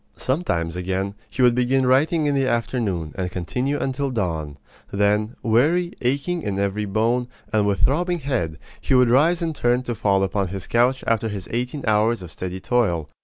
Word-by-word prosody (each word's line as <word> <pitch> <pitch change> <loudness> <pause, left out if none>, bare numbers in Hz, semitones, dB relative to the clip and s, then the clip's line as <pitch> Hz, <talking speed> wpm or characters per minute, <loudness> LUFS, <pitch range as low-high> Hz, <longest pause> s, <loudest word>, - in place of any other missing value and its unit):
Sometimes, 85 - -1
again, 95 +2 -2 0.2
he 130 - -1
would 125 -1 +6
begin 125 +2 +2
writing 150 +5 +3
in 145 - +2
the 135 -1 +1
afternoon, 110 - -1
and 95 -2 -3
continue 125 - -2
until 135 +1 -1
dawn. 80 - -3 0.3
Then, 105 +3 +1
weary, 155 +10 +2
aching 140 +8 0
in 100 -8 -3
every 100 +1 -1
bone, 115 +5 0 0.3
and 105 -2 +3
with 100 -1 0
throbbing 170 - +2
head, 115 - -2 0.2
he - - +1
would 125 -2 +5
rise 165 +7 +3
and 160 -2 -2
turn 120 0 +1
to 120 - -3
fall 100 -3 +1
upon 95 0 0
his 95 0 -6
couch 125 +2 +2
after 115 -1 +1
his 100 -4 -6
eighteen 125 +4 -3
hours 110 -1 +2
of 85 - -9
steady 95 0 -5
toil. 95 -9 0
115 Hz, 180 wpm, -22 LUFS, 100-130 Hz, 0.3 s, would